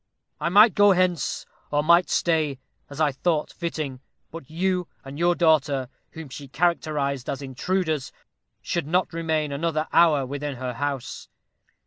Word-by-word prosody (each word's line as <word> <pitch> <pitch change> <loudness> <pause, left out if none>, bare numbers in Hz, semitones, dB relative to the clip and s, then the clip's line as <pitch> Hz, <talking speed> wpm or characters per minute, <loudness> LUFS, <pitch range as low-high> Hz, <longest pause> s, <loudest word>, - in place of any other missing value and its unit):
I 155 - -1
might 205 +3 +7
go 205 -1 +5
hence, 180 -5 0 0.2
or 145 0 +1
might 170 +3 +4
stay, 155 -5 +1 0.3
as 140 +1 -9
I 155 -2 +3
thought 150 +3 -1
fitting; 155 -6 -4 0.3
but 165 -5 -10
you 180 +2 -1 0.2
and 135 +2 -8
your 175 +1 +3
daughter, 145 -6 +2 0.2
whom 160 -1 -8
she 140 +2 -9
characterized 145 -4 -1
as 140 +1 -4
intruders, 155 +2 -2 0.5
should 170 -4 -2
not 180 +2 0
remain 160 -3 -1
another 155 +2 -1
hour 155 -5 +4
within 145 +1 -4
her 125 0 -4
house. 140 -1 -4
155 Hz, 145 wpm, -24 LUFS, 140-170 Hz, 0.5 s, might